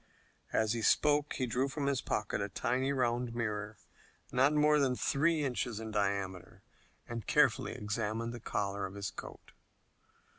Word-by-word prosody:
As 110 0 +2
he 115 - -2
spoke 150 +5 +3
he 130 - -1
drew 125 +3 0
from 140 +1 -3
his 140 -2 +1
pocket 105 -1 -2
a 100 - -2
tiny 130 +7 0
round 120 -2 0
mirror, 105 -2 -3 0.5
not 130 +3 +4
more 150 0 +4
than 130 -3 +2
three 155 +4 +2
inches 125 -4 -2
in 110 -1 -6
diameter, 100 -3 -2 0.4
and 115 -2 -6
carefully - - +3
examined 110 +2 -2
the 120 - -6
collar 100 -2 -2
of 95 - -11
his 100 0 -4
coat. - - -10
120 Hz, 155 wpm, -33 LUFS, 105-135 Hz, 0.5 s, not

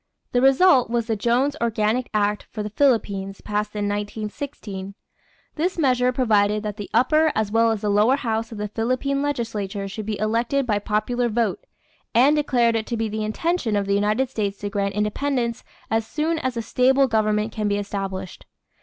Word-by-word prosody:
The 245 - +2
result 270 0 +5
was 235 -1 0
the 225 -1 -1
Jones 245 +7 +1
Organic 230 +1 0
Act 210 -1 0
for 215 - -5
the 210 - -5
Philippines 200 -7 +1
passed 210 0 -3
in 205 -1 -1
1916. 205 -1 -5 0.6
This 355 +4 -1
measure 255 -5 +2
provided 215 -4 +2
that 210 -1 -4
the 205 -3 -7
upper 305 +7 +3
as 215 -1 0
well 230 +1 +4
as 220 -2 -1
the 210 - -1
lower 210 +6 +4
house 225 -4 -2
of 220 - -7
the 210 0 -3
Philippine 255 +6 -1
legislature 220 -8 -3
should 205 +2 -6
be 215 -2 -2
elected 235 +6 0
by 210 -4 +1
popular 230 +4 0
vote, 220 -3 -1 0.5
and 270 +6 +5
declared 245 -6 +2
it 220 -1 -2
to 235 - -2
be 225 0 -1
the 215 +1 -3
intention 235 +2 -1
of 200 -1 0
the 200 - 0
United 210 +6 +1
States 205 -4 -2
to 205 0 -3
grant 200 -1 -1
independence 235 +3 -1 0.3
"as 225 0 0
soon 320 +2 -1
as 260 -4 -2
a 230 - -2
stable 265 +4 +3
government 215 -1 +1
can 215 -2 -2
be 205 0 +1
established." 195 -2 -5
220 Hz, 185 wpm, -23 LUFS, 210-250 Hz, 0.6 s, result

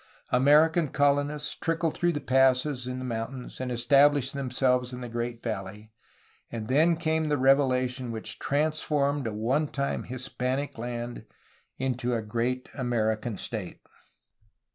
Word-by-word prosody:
American 150 +5 +5
colonists 145 +2 +1
trickled 165 -1 -1
through 175 0 +1
the 145 - -2
passes 130 0 +2
in 125 0 -4
the 130 - -5
mountains, 125 +2 -5
and 130 - -3
estab 135 +4 +5
lished 135 -2 -1
themselves 125 -2 0
in 125 0 -7
the 125 - -5
great 120 0 -4
valley, 105 -1 -5 0.3
— - - -34
and 110 -2 -5
then 160 +5 +4
came 160 -1 0
the 145 - +2
revelation 130 -2 +2
which 110 -1 -5
transformed 145 -2 0
a - - -2
one 125 +9 0
time 140 0 -2
Hispanic 130 +1 -3
land 120 0 -5 0.5
into 125 -2 -1
a 115 - -2
great 120 +4 -2
American 110 -3 -1
state. 105 -5 -5
130 Hz, 140 wpm, -27 LUFS, 120-145 Hz, 0.5 s, American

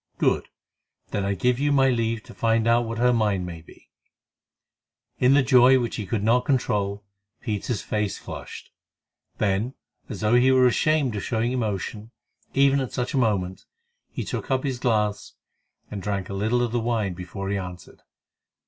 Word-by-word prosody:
"Good! - - +1 0.6
Then 100 - -1
I 100 0 0
give 125 +3 +1
you 145 +1 +1
my 135 -2 +4
leave 115 -2 -1
to 120 - -13
find 115 -1 +1
out 120 +1 +3
what 115 0 -4
her 125 +1 +3
mind 105 -5 +1
may 85 -2 -7
be." 80 - -19 1.3
In 130 +2 +5
the 145 - +5
joy 130 0 +6
which 120 -2 -2
he 105 -4 -5
could 105 +1 -1
not 120 +3 +3
control, 105 -6 0 0.4
Peter's 110 -1 -3
face 105 -2 -2
flushed. - - -9 0.7
Then, 105 +5 0 0.3
as - - -6
though 105 +1 +2
he 125 +2 +5
were 130 -1 +5
ashamed 135 0 +2
of 100 - -3
showing 115 +1 -1
emotion, 110 -2 -3 0.5
even 140 0 +4
at 130 -3 -4
such 125 +4 -2
a - - 0
moment, 95 -6 -1 0.4
he - - -5
took - - -5
up 130 -1 +1
his 130 -4 -2
glass 105 -4 0 0.6
and 100 - -5
drank 100 -1 -3
a - - -5
little 110 +5 +1
of 120 - -1
the 120 - 0
wine 115 -4 -1
before 90 +2 -6
he 100 - 0
answered. 90 -1 -9
115 Hz, 175 wpm, -24 LUFS, 100-125 Hz, 1.3 s, joy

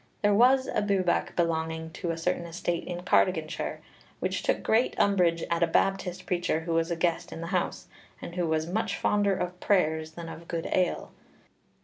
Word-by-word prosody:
There 205 0 +4
was 255 +5 +5
a - - -1
Bwbach 195 -4 +1
belonging 160 -1 -1
to 170 - -5
a 165 - -1
certain 170 +1 -1
estate 170 0 -3
in 175 0 -4
Cardiganshire, 175 -3 +1 0.4
which - - -1
took - - 0
great 225 +3 +2
umbrage 175 -4 +3
at 170 0 +1
a 170 - +4
Baptist 185 +1 0
preacher 175 -3 0
who 165 0 -3
was 165 +1 +1
a 170 - 0
guest 165 0 -1
in 165 - -7
the - - -4
house, 180 - -1 0.3
and 170 - -8
who 175 -1 -1
was 160 0 0
much 205 +4 -1
fonder 205 -1 +2
of 180 0 -4
prayers 160 -5 +1
than 170 0 -7
of 165 +1 -9
good 165 -1 -3
ale. 180 -2 0
175 Hz, 190 wpm, -28 LUFS, 165-190 Hz, 0.4 s, was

